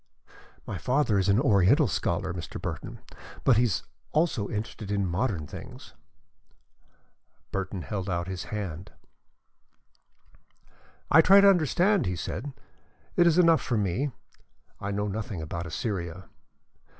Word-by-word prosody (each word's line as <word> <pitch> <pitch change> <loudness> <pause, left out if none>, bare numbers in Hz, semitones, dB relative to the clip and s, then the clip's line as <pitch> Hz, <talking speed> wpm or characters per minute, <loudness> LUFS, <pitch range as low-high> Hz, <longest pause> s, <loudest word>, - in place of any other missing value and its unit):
My - - -5
father 125 -6 +1
is 95 +1 +1
an 100 +3 +4
Oriental 120 - +4
scholar, 90 0 -1
Mr. 85 -2 -6
Burton, - - -6 0.4
but 125 -4 +5
he 120 - +4
is 100 -10 -1 0.3
also 150 -10 +1
interested 105 -1 -5
in 100 -1 0
modern 90 -2 -1
things." - - -10 1.6
Burton 95 -2 -3
held 95 -2 -4
out 85 -1 -2
his 95 -2 -5
hand. 95 -5 -5 2.2
"I 160 - +8
try 195 +4 +7
to 200 - +7
understand 180 +2 +2 0.2
London," - - 0
he 90 - -2
said. 105 - -5 0.6
"It 175 - +5
is 170 0 +3
enough 165 -3 +5
for 120 - -1
me. 105 +8 0 0.7
I 100 - -4
know 105 +1 -1
nothing 105 -2 -4
about 85 +2 -5
Assyria." 90 0 -4
105 Hz, 135 wpm, -27 LUFS, 90-135 Hz, 2.2 s, I